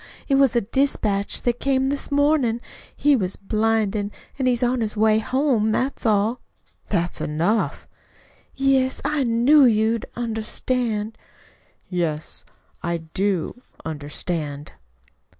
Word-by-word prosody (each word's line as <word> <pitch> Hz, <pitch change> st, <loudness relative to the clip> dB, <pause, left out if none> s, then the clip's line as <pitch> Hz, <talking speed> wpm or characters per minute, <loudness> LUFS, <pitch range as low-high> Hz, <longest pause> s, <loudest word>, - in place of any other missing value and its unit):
It 275 Hz, -, +1 dB
was 270 Hz, -3 st, +4 dB
a 235 Hz, -, +4 dB
dispatch 210 Hz, -4 st, 0 dB
that 240 Hz, -1 st, 0 dB
came 265 Hz, -1 st, +1 dB
this 285 Hz, +1 st, -1 dB
mornin'. 285 Hz, -5 st, +2 dB, 0.4 s
He 290 Hz, 0 st, +4 dB
was 190 Hz, -6 st, -1 dB
blinded, 215 Hz, -1 st, 0 dB, 0.3 s
an' 260 Hz, -, +1 dB
is 245 Hz, -1 st, +2 dB
on 245 Hz, 0 st, +1 dB
his 215 Hz, -1 st, -2 dB
way 215 Hz, 0 st, +4 dB
home. 250 Hz, -2 st, +1 dB
That's 255 Hz, +1 st, -1 dB
all." 215 Hz, +3 st, +2 dB, 0.5 s
"That's 175 Hz, +1 st, 0 dB
enough." 170 Hz, +9 st, 0 dB, 0.7 s
"Yes, 270 Hz, -1 st, +2 dB
I 295 Hz, -1 st, +1 dB
knew 245 Hz, +5 st, +5 dB
you'd 225 Hz, -1 st, +2 dB
understand." 225 Hz, -1 st, -2 dB, 0.7 s
"Yes, 165 Hz, -4 st, -2 dB, 0.4 s
I 170 Hz, 0 st, -1 dB, 0.2 s
do 195 Hz, +4 st, -1 dB, 0.2 s
understand." 150 Hz, -1 st, -4 dB
225 Hz, 115 wpm, -23 LUFS, 200-260 Hz, 0.7 s, knew